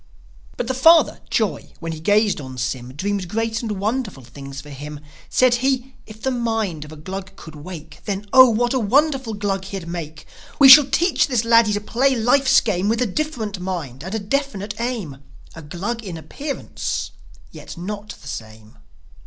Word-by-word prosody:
But - - -2
the 260 - -2
father, 320 +5 +5
joi, 215 -4 -1
when 165 -1 -5
he 160 - -6
gazed 205 +1 +2
on 130 -2 -9
Sym, 125 0 -4
Dreamed 195 +3 -2
great 225 +3 -2
and 225 -3 -3
wonderful 205 - -3
things 135 +3 -9
for 150 - -11
him. 145 +2 -8 0.3
Said 255 -1 +4
he, 265 -1 0
"If 215 0 -13
the 265 - +1
mind 225 - -2
of 150 - -12
a - - -9
Glug 190 +4 -7
could 160 -4 -12
wake 155 0 -10
Then, 200 0 -3
Oh, 260 -1 +9
what 240 +2 +1
a 260 - +1
wonderful 265 +1 +1
Glug 195 -2 -2
he'd 195 -3 -6
make! 160 -3 -7 0.3
We 275 -2 +8
shall 275 +1 +11
teach 330 +7 +2
this 245 -5 0
laddie 230 -2 +5
to 205 - -1
play 260 +5 +1
life's 260 +3 +4
game 200 -2 0
With 230 +2 +1
a - - 0
different 220 -4 -3
mind 165 -8 -5
and 190 +5 -5
a - - +1
definite 215 -2 -3
aim: 225 - -3 0.4
A 165 - -10
Glug 195 +10 -5
in 180 -5 -6
appearance, 280 - -5 0.4
yet - - -10
not 205 +4 -6
the - - -11
same." 110 - -9
205 Hz, 185 wpm, -21 LUFS, 165-245 Hz, 0.4 s, shall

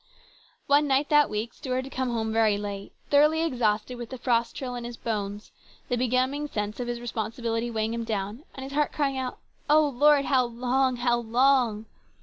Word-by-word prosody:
One 290 +1 +4
night 275 +1 +2
that 295 -1 +5
week 215 +2 -3
Stuart 260 -2 -3
had 270 - -10
come 260 -1 -1
home 220 -2 -2
very 220 -2 +3
late, 200 -1 -6 0.2
thoroughly 300 +3 +4
exhausted 240 -4 0
with 240 -1 -6
the 260 - -6
frost 235 -1 0
chill 255 -2 -4
in 245 -1 -5
his 240 0 -7
bones, 205 -2 -4 0.4
the 245 - +1
benumbing 255 +4 0
sense 210 -4 -4
of 245 - -3
his 240 0 -3
responsibility 230 0 -3
weighing 220 -1 -1
him 230 0 -3
down, 215 +1 -3
and 265 - -7
his 270 +1 -7
heart 295 0 +1
crying 275 -3 0
out, 255 -1 -4 0.2
" - - -36
O 305 0 +5
Lord, 285 +1 +4
how 260 -2 +3
long! 250 +2 0
how 240 0 +1
long 240 -2 +2
245 Hz, 195 wpm, -26 LUFS, 225-270 Hz, 0.4 s, that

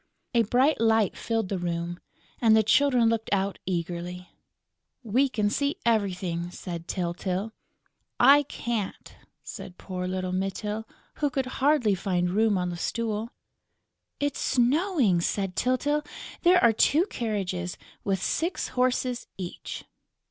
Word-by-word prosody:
A 235 - +5
bright 250 +6 +2
light 225 -3 +3
filled 225 -4 -2
the 195 - -2
room; 175 0 -3 0.4
and 220 -2 +6
the 220 - +4
Children 250 +1 +4
looked 225 -1 0
out 200 0 0
eagerly: 175 0 -4 0.7
"We 250 +5 +2
can 210 -4 0
see 280 +4 0
everything!" 185 -6 0
said 170 -1 -7
Tyltyl. 185 +3 -2 0.7
"I 285 +1 +8
can't," 235 -7 -4 0.3
said 180 - -8
poor 180 -1 -5
little 185 0 -2
Mytyl, 200 +3 -2 0.3
who 290 - +1
could 270 0 -1 0.2
hardly 270 -7 +4
find 180 -2 0
room 215 +1 +3
on 180 -1 -1
the 175 - -5
stool. 225 +3 -2 0.9
"It's 285 -1 -1
snowing!" 260 - +2
said 195 +1 -1
Tyltyl. 290 +4 +1 0.4
"There 360 +1 +6
are 235 -1 +6
two 295 - +4
carriages, 190 - -3 0.3
with 195 -1 0
six 335 +9 -1
horses 250 -1 0
each!" 180 -2 -6
215 Hz, 130 wpm, -27 LUFS, 180-250 Hz, 0.9 s, I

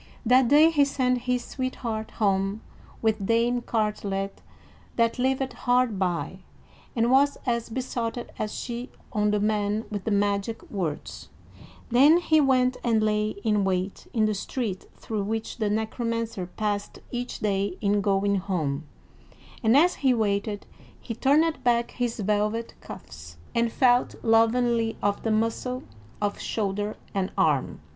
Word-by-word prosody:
That 250 +2 +5
day 300 +5 +6
he 295 -3 +4
sent 255 -3 +1
his 250 -1 +1
sweetheart 235 -4 -4
home 195 0 +1 0.4
with 220 -2 +1
Dame 235 +1 +2
Cartelet, 205 -4 -2 0.5
that 230 +1 +1
lived 265 +1 0
hard 245 -5 +1
by, 180 -3 -1 0.6
and 235 +1 +2
was 280 +2 +4
as 235 -2 -1
besotted 240 -1 -3
as 215 -1 -2
she 240 +1 -5 0.2
on 210 0 +2
the 210 0 +1
man 210 +1 0
with 205 -3 -4
the - - 0
magic 205 +1 0
words; 170 -8 -4 0.6
then 280 +7 +7
he 315 -3 +3
went 255 -2 +3
and 225 -3 +2
lay 210 0 +1
in 210 -2 +2
wait 190 0 -2
in 220 -2 +2
the 215 - +1
street 205 -1 -4
through 215 -2 -4
which 220 +2 -3
the 215 -2 +1
Necromancer 225 -2 -2
passed 205 +1 -3
each 245 0 -4
day 195 -2 -1
in 205 -1 +2
going 200 0 +2
home; 160 -6 -2 0.7
and 230 +2 +5
as 345 +5 +4
he 260 -3 +4
waited, 205 -1 -1 0.3
he 230 - -6
turned 305 +7 +2
back 235 -1 +2
his 240 -2 -2
velvet 210 +3 0
cuffs, 75 +3 -11 0.2
and 235 -1 +1
felt 245 0 +3
lovingly 230 0 +3
of 205 0 +1
the 225 - -1
muscle 230 +3 -1 0.4
of 205 -1 -1
shoulder 205 0 -2 0.2
and 195 -2 -1
arm. 145 - +1
220 Hz, 145 wpm, -26 LUFS, 205-245 Hz, 0.7 s, then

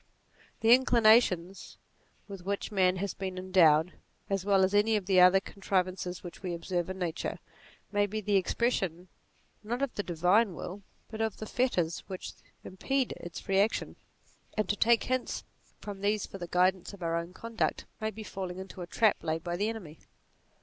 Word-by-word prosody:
The 225 +1 +7
inclinations 220 -7 +3 0.5
with 195 -3 -9
which 200 +3 -3
man 185 -2 +3
has 195 +1 -3
been 190 -1 -5
endowed, 180 -3 +4 0.4
as 195 -2 0
well 195 -1 +4
as 190 +1 +2
any 210 +2 +4
of 205 -3 -1
the 185 -1 +4
other 180 +1 +7
con 195 +1 -14
trivances 185 -2 -1
which 175 - -9
we 180 -3 -3
observe 175 +1 -2
in 190 - -5
Nature, 175 -2 -3 0.5
may 205 0 +2
be 215 +2 -3
the 205 -1 0
expression 190 -3 0 0.5
not 240 +5 -3
of 275 - -1
the - - -2
divine 180 +3 +2
will, 190 +6 -7 0.3
but 220 0 -4
of 220 -2 -1
the 215 - -6
fetters 180 -9 0
which 190 -2 -6 0.3
impede 265 +7 -1
its 175 -1 -7
free 195 -1 0
action; 210 +3 0 0.6
and 215 - +1
to 205 - +2
take 230 +2 +4
hints 255 -1 -2 0.3
from 205 -2 -7
56 - - -14
NATURE 205 +1 +3
these 215 -1 -2
for - - -9
the 175 - -5
guidance 185 +2 +1
of 185 - -11
our 165 0 0
own 170 +1 -3
conduct 230 +4 -2
may 220 0 -1
be 220 +1 -8
falling 185 -3 -6
into 190 -1 -8
a 175 - -6
trap 220 +3 +2
laid 160 0 -2
by 175 -1 -2
the 205 +4 0
enemy. 180 -9 -8
190 Hz, 190 wpm, -30 LUFS, 180-215 Hz, 0.6 s, The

